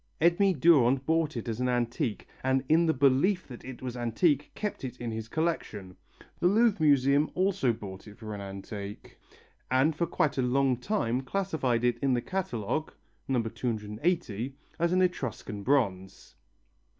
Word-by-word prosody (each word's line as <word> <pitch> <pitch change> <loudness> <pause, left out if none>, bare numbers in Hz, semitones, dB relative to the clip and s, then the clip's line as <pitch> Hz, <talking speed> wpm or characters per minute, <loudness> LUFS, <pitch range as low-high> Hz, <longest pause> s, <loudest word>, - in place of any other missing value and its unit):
Edme 175 +4 +4
Durand 135 -4 +5
bought 160 -3 +1
it 115 - -5
as 115 0 -3
an 125 0 +1
antique 120 -2 -1 0.2
and 130 0 +2
in 165 +3 +4
the - - +4
belief 140 +8 +2
that 125 -3 -10
it 130 -1 -9
was 125 -1 -4
antique 130 +5 +1
kept 210 -8 -4
it 125 -1 -6
in 120 -1 -4
his 110 0 -5
collection. 110 - -3 0.4
The 175 - +3
Louvre 215 -1 +3
Museum 140 0 +4
also 185 -9 +2
bought 100 -4 -8
it 105 - -12
for 110 -2 -7
an 100 - -6
antique 100 +1 -8 0.5
and 135 +5 +3
for 170 +2 0
quite 145 -3 0
a - - +4
long 130 0 +2
time 125 - -1
classified 135 -6 -1
it 120 -1 +1
in 135 -2 +2
the - - +1
catalogue 155 - -2 0.4
(N. 125 -3 +2
280) 115 - -2 0.2
as 170 +1 +2
an 185 +1 +3
Etruscan 125 - -3
bronze. 100 -7 -1
130 Hz, 160 wpm, -29 LUFS, 115-160 Hz, 0.5 s, Durand